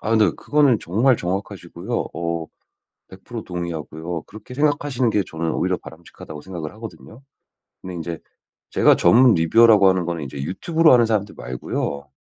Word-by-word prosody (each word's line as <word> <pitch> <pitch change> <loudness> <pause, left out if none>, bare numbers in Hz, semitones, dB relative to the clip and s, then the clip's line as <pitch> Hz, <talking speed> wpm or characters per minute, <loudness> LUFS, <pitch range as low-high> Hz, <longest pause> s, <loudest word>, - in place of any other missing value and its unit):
아 110 - -4
근데 110 -5 +4
그거는 145 -6 +2
정말 115 +8 +2
정확하시고요 95 +3 -4
어 85 -1 -3 0.6
100% 110 +4 -9
동의하고요 85 -1 -5
그렇게 110 +4 -13
생각하시는 145 -2 0
게 105 -2 +1
저는 80 0 -3
오히려 - - -1
바람직하다고 80 -2 -12
생각을 85 -5 -7
하거든요. 110 +2 -11 0.6
근데 95 - -7
인제 85 -1 -5 0.5
제가 - - +4
전문 125 -1 +5
리뷰어라고 105 +5 +5
하는 95 -2 +2
거는 85 -4 -3
이제 70 +1 -7
유튜브로 160 - +3
하는 120 -1 +5
사람들 110 -2 -1
말고요 70 +3 -4
95 Hz, 385 characters per minute, -21 LUFS, 85-115 Hz, 0.6 s, 전문